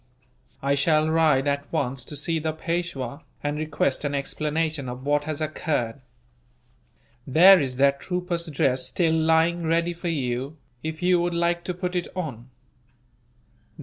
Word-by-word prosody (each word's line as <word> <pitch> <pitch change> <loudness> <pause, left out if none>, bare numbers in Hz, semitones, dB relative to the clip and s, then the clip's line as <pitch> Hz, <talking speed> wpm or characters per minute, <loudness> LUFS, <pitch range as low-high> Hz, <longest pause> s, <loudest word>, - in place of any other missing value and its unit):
I 140 +1 +2
shall 155 +2 +2
ride, 155 -4 +3
at 140 0 -2
once, 135 -5 -1
to 150 - -7
see 160 +3 0
the 155 0 -2
Peishwa, 160 -5 -3 0.2
and 145 +1 -2
request 150 -3 0
an 145 -1 -1
explanation 150 0 -2
of 125 +2 -7
what 145 0 +1
has 155 0 -3
occurred. 145 -5 -2 1.3
There 180 +8 +8
is 130 -4 -2
that 140 +1 +3
trooper's 180 -1 -2
dress 130 -4 0
still 165 -3 +1
lying 160 +2 +3
ready 170 +1 +1
for 170 +1 -4
you, 135 -1 -2 0.2
if 160 +2 -5
you 180 -1 +4
would 175 0 -1
like 170 0 +1
to 180 - -3
put 180 0 -3
it 175 - -1
on. 130 -9 -5
155 Hz, 150 wpm, -25 LUFS, 140-170 Hz, 1.3 s, There